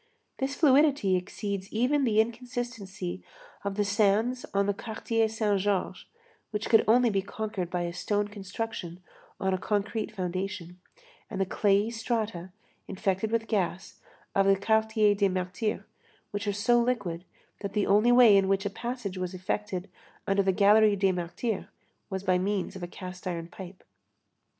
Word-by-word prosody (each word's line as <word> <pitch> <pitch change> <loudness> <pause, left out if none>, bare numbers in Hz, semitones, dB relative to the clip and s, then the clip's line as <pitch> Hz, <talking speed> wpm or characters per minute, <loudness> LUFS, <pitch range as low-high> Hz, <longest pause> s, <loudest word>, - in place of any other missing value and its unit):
This 270 +1 -1
fluidity 280 - +4
exceeds 195 +1 -4
even 260 +5 +2
the 220 -3 +2
inconsistency 230 - -3 0.4
of 200 -1 -2
the 205 0 +1
sands 210 +5 +2
of 200 0 0
the 205 - +1
Quartier 225 +1 -1
Saint 215 -2 +1
Georges, 190 -2 -1 0.4
which 210 0 -3
could 225 - +7
only 240 +1 +5
be 195 -1 +1
conquered 200 -3 -4
by 180 -1 -1
a 170 0 -3
stone 205 +3 -1
construction 200 -3 -6 0.4
on 190 0 0
a 185 - -1
concrete 210 +2 -1
foundation, 185 -2 -4 0.5
and - - -5
the 195 - +2
clayey 205 +3 +2
strata, 220 -6 -2 0.4
infected 195 +2 -1
with 225 0 0
gas, 190 -4 -2 0.3
of 195 0 +3
the 195 - +6
Quartier 220 +1 +3
des 200 -1 +2
Martyrs, 185 +4 -2 0.5
which 205 0 -4
are - - +2
so 225 +4 +3
liquid 205 -9 -1 0.4
that 200 -1 -5
the 210 -2 +1
only 210 +4 +4
way 245 -4 +8
in 195 -1 +4
which 195 +1 +1
a 200 - -1
passage 235 -4 -5
was 185 0 -3
effected 185 0 -3 0.4
under 195 0 +2
the 195 0 +2
gallery 210 +2 +5
des 195 -1 +2
Martyrs 180 +5 -3 0.4
was 190 -1 -4
by 185 -1 +2
means 195 0 -1
of 190 - -7
a 175 - -4
cast 180 +1 -8
iron 170 -2 -3
pipe. 185 +1 -11
200 Hz, 160 wpm, -28 LUFS, 190-220 Hz, 0.5 s, way